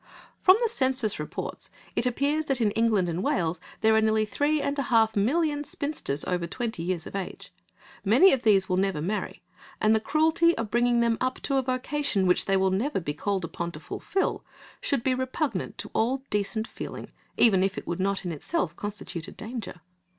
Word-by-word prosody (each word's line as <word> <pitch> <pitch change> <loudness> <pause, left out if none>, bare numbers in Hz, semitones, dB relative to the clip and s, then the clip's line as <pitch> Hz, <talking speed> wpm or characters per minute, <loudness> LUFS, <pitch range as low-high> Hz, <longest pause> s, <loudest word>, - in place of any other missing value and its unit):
From 370 +1 +6
the - - +4
Census 260 - 0
reports 150 - -5 0.3
it 245 - +1
appears 285 +5 0
that 270 -3 0
in 215 -3 +2
England 220 -4 +2
and 170 +1 -2
Wales 175 -3 0 0.2
there 220 0 +5
are 220 - +4
nearly 220 0 +2
three 290 +7 +1
and 280 0 -1
a 275 - -2
half 225 -2 +4
million 290 +8 +1
spinsters 285 - -3
over 175 -2 -1
twenty 230 -1 -4
years 175 -1 -2
of - - -8
age; 195 -2 -6 0.5
many 250 - +6
of 265 - +1
these 195 -4 +4
will 185 - 0
never 195 -4 +1
marry, 195 +8 -3 0.4
and 215 +1 +4
the 220 - +3
cruelty 320 +6 +3
of 225 -2 -3
bringing 240 0 +3
them 230 -1 +1
up 255 0 -1
to 275 - +1
a - - +3
vocation, 255 -4 0
which 180 -1 +3
they 195 0 +2
will 190 0 +2
never 220 +7 0
be 150 -5 -3
called 190 +4 -2
upon 170 +1 -4
to 155 - -8
fulfil, 380 - -2 0.4
should 275 -5 0
be 260 - +2
repugnant 260 +4 -2
to - - -5
all 260 +4 +1
decent 210 +2 0
feeling, - - -8 0.3
even 195 -5 +5
if 195 +1 0
it - - -5
would 170 - -3
not 195 0 -1
in 175 - -2
itself 170 - -2
constitute 200 -5 -5
a - - -8
danger. 220 -6 -7
220 Hz, 200 wpm, -27 LUFS, 190-265 Hz, 0.5 s, From